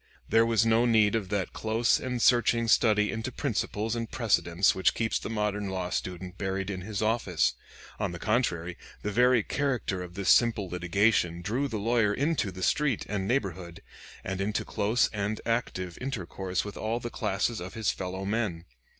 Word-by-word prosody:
There 115 +1 +4
was 115 -1 +3
no 115 +2 +4
need 110 -3 +4
of 105 -5 -1
that 100 -2 -2
close 115 +2 +1
and 125 -1 -3
searching 120 -1 +3
study 105 -2 +4
into 115 +3 -4
principles 110 -4 -2
and 115 -1 -3
precedents 100 -7 +2
which 95 - +2
keeps 115 -1 0
the - - -6
modern 105 -2 -1
law 90 -1 -3
student 90 0 -4
buried 95 0 -2
in 95 -2 -5
his 105 +2 -3
office. 110 -6 +1 0.5
On - - -1
the 85 - -6
contrary, 90 -5 -1 0.3
the 105 - -2
very 125 +1 +4
character 125 -10 -1
of 90 -1 -8
this 100 -1 -1
simple 115 -5 +4
litigation 90 0 +1
drew 120 +8 -1
the 115 -5 -4
lawyer 110 -1 +2
into 145 -8 0
the 95 0 -7
street 145 +3 +1
and 95 -2 -2
neighborhood, 95 -8 -2 0.4
and 95 0 -3
into 105 +2 -1
close 110 +4 +1
and 105 0 -3
active 95 -7 -2
intercourse 95 -7 -3
with 105 - -7
all 115 +2 -2
classes 115 -2 -2
of 90 +1 -7
his 110 -1 +1
fellow 95 +1 -5
men. 100 -5 -2
105 Hz, 175 wpm, -28 LUFS, 95-115 Hz, 0.5 s, There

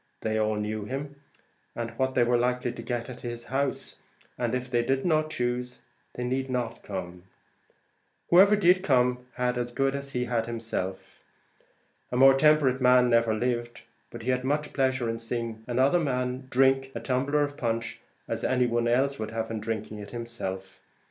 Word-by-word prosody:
They 110 0 0
all 110 0 +1
knew 105 0 -3
him, 140 +4 -5 0.6
and 115 -1 -4
what 130 +3 -1
they 125 - +5
were 120 +1 +2
likely 125 0 +1
to 120 - -8
get 120 -2 -3
at 125 -1 -8
his 120 -1 -6
house, 135 +1 -2 0.4
and 120 0 -1
if 125 0 -3
they 120 -2 +1
did 135 +2 0
not 155 -2 +2
choose, 125 -2 -2 0.4
they 125 - -3
need 130 +2 -1
not 120 -2 -2
come. 90 -2 -7 1.1
Whoever 195 +4 +7
did 185 -2 +4
come 125 -5 +2
had 125 0 0
as 120 0 -3
good 135 +2 +1
as 140 0 -5
he 125 0 0
had 115 -2 -1
himself. 110 -5 -5 0.9
A 125 - -1
more 135 +1 +8
temperate 135 -2 +4
man 125 -1 +5
never 115 -1 +3
lived; 120 +1 -2 0.3
but - - -9
he 130 - +1
had 125 - +1
as 125 - -9
much 150 +2 -1
pleasure 130 -3 +1
in 115 0 -2
seeing 115 -1 -4
another 130 +7 +3
man 125 -3 -2
drink 135 +1 +3
a - - -2
tumbler 140 +3 +1
of 145 0 -3
punch, 115 -2 -2 0.3
as - - -3
any 125 -1 +2
one 120 0 0
else 135 +4 +1
would 110 0 -3
in 115 0 -3
drinking 110 -1 -4
it 100 -1 -8
himself. 95 -6 -6
125 Hz, 180 wpm, -27 LUFS, 115-135 Hz, 1.1 s, more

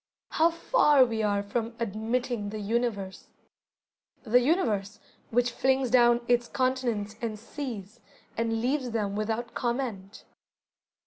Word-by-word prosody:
How 325 +2 +4
far 300 - +4
we 225 -2 -2
are 205 -1 +1
from 230 +3 -3
"admitting 230 0 -2
the 215 - -5
Universe"! 210 -2 -2 1.0
The 245 0 +4
Universe, 210 - 0 0.3
which 245 +1 +1
flings 265 0 +1
down 240 -1 +5
its 240 -1 +2
continents 245 -6 -1
and 225 -2 -3
seas, 230 -3 -7 0.4
and 225 0 -1
leaves 255 +1 0
them 210 -3 -2
without 225 +3 -2
comment. 235 -6 -3
235 Hz, 120 wpm, -28 LUFS, 215-250 Hz, 1.0 s, down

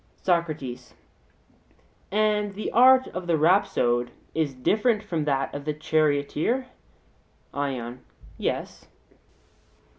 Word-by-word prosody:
SOCRATES: 155 -9 -2 1.2
And 210 -1 +1
the 215 - -4
art 260 +2 +6
of 180 -1 -6
the 165 -2 +2
rhapsode 135 -8 +2 0.2
is 155 -4 -1
different 215 - +1
from 165 -7 -2
that 135 -2 0
of 145 - -5
the 150 -1 -2
charioteer? 155 - 0 0.9
ION: 130 -3 -4 0.3
Yes. - - -4
155 Hz, 95 wpm, -25 LUFS, 140-210 Hz, 1.2 s, art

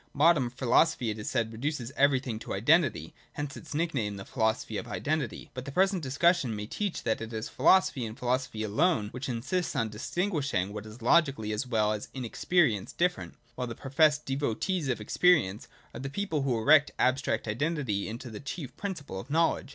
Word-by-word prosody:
Modern 145 -4 +4
philosophy, 120 -2 +2
it 105 - -6
is 105 - -4
said, 115 0 -1
reduces 130 +1 -3
everything 135 -5 +2
to - - -5
identity. 155 - +2 0.2
Hence 145 -2 -5
its 155 -2 -9
nickname, 135 -11 -1
the 95 - -8
Philosophy 110 -3 -1
of - - -8
Identity. 150 -6 -3
But 130 0 -6
the 140 - -6
present 190 +3 +2
discussion 145 -2 +2
may 105 0 -4
teach 200 - -3
that 110 - 0
it 115 0 -6
is 110 0 -4
philosophy, 185 -9 +3
and 110 - -9
philosophy 125 -2 -1
alone, 110 - +1
which 130 +2 -5
insists 135 +9 -2
on 115 - 0
distinguishing 135 - -1
what 105 0 -6
is 110 +2 -12
logically 135 -6 +3
as 110 +5 -2
well 110 -3 +2
as 105 - -5
in 130 -2 -4
experience 115 - +1
different; 180 +1 -1 0.2
while 125 +1 -4
the 115 - -6
professed 150 +3 +2
devotees 140 - -1
of 125 - 0
experience 110 - +2 0.3
are - - -7
the 135 +1 -4
people 165 -1 -2
who 130 -3 0
erect 145 +5 +5
abstract 130 -3 +1
identity 120 -4 -1
into 120 +2 -7
the 105 - -7
chief 140 -2 -6
principle 155 - -5
of 115 - -10
knowledge. 165 -2 +1
130 Hz, 185 wpm, -29 LUFS, 110-155 Hz, 0.3 s, erect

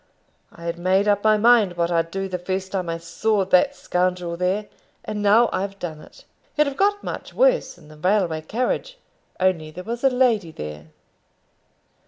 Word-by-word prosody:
I 170 - -14
had 170 0 -4
made 190 +3 +2
up 205 -1 +2
my 215 -1 +5
mind 215 -5 +4
what 170 0 0
I'd 165 -1 +1
do 195 +2 -3
the 180 -1 -4
first 190 +1 -3
time 185 -3 -2
I 165 - -2
saw 195 +5 0
that 195 +10 +3
scoundrel 180 -5 -1
there; 185 +4 -1 0.4
and 210 -1 -4
now 215 +4 +5
I've 195 +1 -3
done 160 -5 -6
it. - - -17 0.3
He'd 300 - +5
have 280 -1 -3
got 410 +3 +1
much - - -6
worse - - +2
in 155 -4 -17
the 155 0 -14
railway 180 -2 +1
carriage, 255 - -2 0.4
only 180 -4 +1
there 180 +4 -9
was 235 +4 -5
a 270 - +6
lady 245 -8 +2
there." 75 - -8
190 Hz, 185 wpm, -23 LUFS, 170-220 Hz, 0.4 s, a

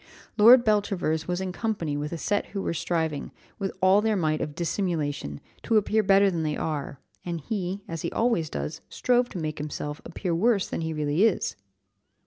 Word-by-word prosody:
"Lord 235 +3 +8
Beltravers 195 -7 +1
was 180 +1 -1
in 190 -1 -2
company 180 -7 -2
with 150 +1 -3
a 170 - -3
set 205 +5 -1
who 200 - -4
were - - -1
striving, 160 -3 -2 0.3
with 195 -1 -2
all 190 +2 +5
their 220 0 +1
might 155 -4 0
of 150 - -4
dissimulation, 155 - -2 0.2
to 225 - +2
appear 215 +1 +2
better 195 0 +4
than 170 -2 -2
they 155 -1 -1
are, 145 -3 -3 0.2
and 170 -1 -3
he, 190 +3 -3
as 165 -1 -5
he - - -3
always 225 -10 +1
does, 155 - -4
strove 245 0 +2
to - - -7
make 155 -3 -3
himself 150 0 -5
appear 175 +1 -3
worse 200 +3 +2
than - - -4
he 160 0 -2
really 150 +3 +1
is." 220 - +1
175 Hz, 190 wpm, -26 LUFS, 155-205 Hz, 0.3 s, Lord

